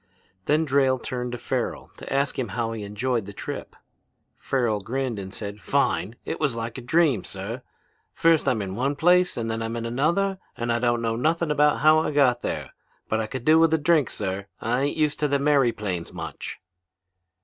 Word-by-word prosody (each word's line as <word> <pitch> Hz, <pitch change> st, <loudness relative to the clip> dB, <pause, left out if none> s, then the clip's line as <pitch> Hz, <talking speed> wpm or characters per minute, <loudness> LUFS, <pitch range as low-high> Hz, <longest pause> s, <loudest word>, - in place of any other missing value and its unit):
"Then 155 Hz, +2 st, +3 dB
Drayle 135 Hz, -2 st, +3 dB
turned 125 Hz, 0 st, -4 dB
to -, -, -3 dB
Farrel 120 Hz, +1 st, -3 dB
to -, -, -9 dB
ask 140 Hz, 0 st, 0 dB
him 125 Hz, -, -1 dB
how 115 Hz, -1 st, 0 dB
he 115 Hz, -1 st, -5 dB
enjoyed 105 Hz, +2 st, -2 dB
the 100 Hz, -, -8 dB
trip. -, -, -6 dB, 0.6 s
Farrel 120 Hz, -6 st, 0 dB
grinned 125 Hz, 0 st, -2 dB
and 95 Hz, -1 st, -7 dB
said, 100 Hz, +1 st, -6 dB
'Fine! 90 Hz, +8 st, 0 dB
It -, -, -4 dB
was 145 Hz, -6 st, 0 dB
like 115 Hz, +2 st, -4 dB
a -, -, -8 dB
dream, 135 Hz, -, +2 dB
sir! 105 Hz, +6 st, -6 dB, 0.5 s
First 165 Hz, -2 st, +3 dB
I'm 110 Hz, -5 st, +1 dB
in 95 Hz, -1 st, -5 dB
one 135 Hz, +7 st, 0 dB
place 180 Hz, +4 st, +3 dB
and 115 Hz, -1 st, -2 dB
then 115 Hz, 0 st, -2 dB
I'm 115 Hz, +1 st, -3 dB
in 115 Hz, 0 st, -3 dB
another 170 Hz, +11 st, +1 dB, 0.2 s
and 120 Hz, 0 st, 0 dB
I 115 Hz, -, +1 dB
don't 120 Hz, -1 st, +1 dB
know 115 Hz, 0 st, 0 dB
nothing 160 Hz, +5 st, +1 dB
about 150 Hz, 0 st, +3 dB
how 155 Hz, +1 st, +6 dB
I 160 Hz, -, 0 dB
got 135 Hz, -5 st, +3 dB
there. -, -, -4 dB, 0.4 s
But 110 Hz, -, +1 dB
I 110 Hz, -, -1 dB
could 125 Hz, +1 st, -6 dB
do 155 Hz, +1 st, +6 dB
with 165 Hz, 0 st, +5 dB
a -, -, +2 dB
drink, 155 Hz, -3 st, +3 dB
sir. 100 Hz, 0 st, -4 dB
I 120 Hz, +3 st, 0 dB
ain't 145 Hz, -, -2 dB
used 150 Hz, -1 st, +1 dB
to 150 Hz, -, +2 dB
them 140 Hz, 0 st, +1 dB
airyplanes 110 Hz, -, +1 dB
much.' -, -, -6 dB
125 Hz, 205 wpm, -25 LUFS, 115-150 Hz, 0.6 s, how